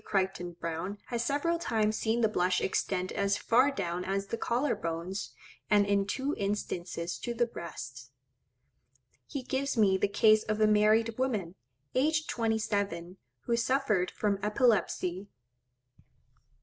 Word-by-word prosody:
Crichton 190 -3 -1
Browne 170 +4 -4
has 235 -1 -1
several 290 +7 0
times 215 -7 +1
seen 225 +2 0
the 220 - +5
blush 180 -3 +1
extend 185 -1 -1
as 200 0 +1
far 250 +5 +4
down 180 -10 -3
as 195 +1 -1
the 215 - -3
collar 240 +5 0
bones, 170 +4 -4 0.4
and 205 -1 +5
in 200 -1 +1
two 270 +7 -1
instances 180 -4 -3
to 240 - -4
the 240 +1 +2
breasts. 130 - -8 1.2
He 275 - -5
gives 265 +1 -2
me 195 -3 +4
the 205 - +3
case 215 +2 +5
of 215 0 -2
a 215 - +5
married 215 +2 +3
woman, 215 -10 -1 0.4
aged 310 +4 +2
twenty 225 -2 0
seven, 195 -5 -2 0.2
who 235 - 0
suffered 235 -6 +1
from 205 -2 -1
epilepsy. 210 -4 +1
210 Hz, 140 wpm, -30 LUFS, 185-235 Hz, 1.2 s, the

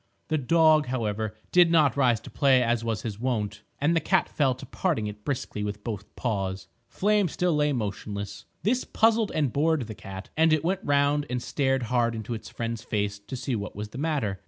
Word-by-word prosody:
The 155 -1 +1
dog, 155 +2 +4
however, 110 -3 -2 0.2
did 175 -1 +6
not 155 -6 +4
rise 125 -5 +3
to - - -11
play 135 -3 +4
as 115 -1 +1
was 115 -2 -2
his 105 -3 -5
wont, 105 -5 -2 0.2
and 160 +4 +2
the - - +4
cat - - +2
fell 135 -4 +1
to - - -10
parting 160 - -1
it 105 0 -7
briskly 120 -6 -3
with 105 0 -4
both 105 -3 -6
paws. 95 -6 -2 0.2
Flame 205 -1 +2
still 175 +2 0
lay 150 0 +2
motionless. 100 -4 -4 0.2
This 245 +5 +2
puzzled 225 -1 +2
and 145 -6 +1
bored 155 -2 +2
the 110 - -7
cat, 95 -2 -9
and 160 +1 +4
it 155 - +2
went 190 +2 0
round 145 +1 +2
and 125 0 -1
stared 135 0 0
hard 120 -1 +1
into 110 +1 -4
its 110 - -7
friend's 115 -1 -4
face 100 -2 -2
to 100 +6 -8
see 130 0 -2
what 105 -1 -5
was 105 0 -5
the 125 - -8
matter. 140 - -1
125 Hz, 205 wpm, -27 LUFS, 105-150 Hz, 0.2 s, did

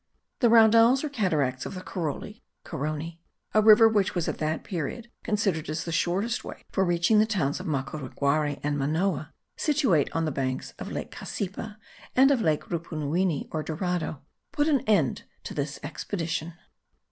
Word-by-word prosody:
The 240 - +4
Raudales 230 +3 +6
or 305 - -2
cataracts 155 - 0
of - - -6
the 185 - -7
Caroli 180 +5 -5 0.2
(Carony), 155 +2 -4 0.3
a 215 - +5
river 220 +1 +8
which 205 -4 +1
was 175 -2 0
at - - -3
that 155 0 -1
period 205 +7 -5
considered 195 -8 0
as 155 +1 -2
the 170 - -5
shortest 195 +9 0
way - - -9
for 190 - +2
reaching 175 +4 +3
the 215 - +4
towns 175 -11 0
of - - -6
Macureguarai 140 +1 -1
and 145 0 0
Manoa, 155 +2 0 0.3
situate 265 - +2
on 165 0 +1
the 155 - -1
banks 130 -1 -3
of - - -6
lake - - -5
Cassipa 205 +2 -5 0.4
and 270 +2 +6
of 265 -4 +2
lake 155 -5 +1
Rupunuwini 165 0 -1
or 155 - -2
Dorado, 160 -3 -3 0.3
put 290 +1 +1
an 290 -4 +4
end 195 -11 +2 0.2
to - - -6
this 140 -1 -3
expedition. 165 +1 -3
170 Hz, 165 wpm, -27 LUFS, 150-215 Hz, 0.4 s, river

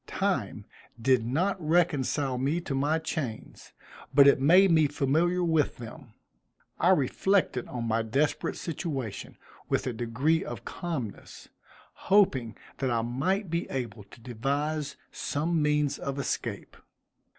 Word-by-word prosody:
Time - - -2 0.3
did 125 0 +3
not 180 +9 0
reconcile 145 -5 +1
me 140 +6 0
to 160 -5 -5
my 145 +4 +1
chains, 150 -8 -5 0.4
but 140 -1 +7
it 140 - +5
made 180 +6 +6
me 160 -2 +5
familiar 160 +6 +1
with 160 -4 +1
them. 120 0 -11 0.6
I 175 - +3
reflected 180 -3 +2
on 120 -2 -5
my 115 0 +1
desperate 135 +7 0
situation 145 - -5 0.3
with - - 0
a 125 - -2
degree 125 - 0
of - - -7
calmness, 160 - -6 0.6
hoping 135 - +3 0.2
that 135 - 0
I 115 -2 0
might 160 - -1
be 170 +1 -2
able 115 -6 -4
to - - -16
devise 140 +6 -2 0.2
some 160 +3 -1
means 150 -1 +1
of 140 0 -4
escape. 140 - -4
145 Hz, 130 wpm, -28 LUFS, 125-165 Hz, 0.6 s, but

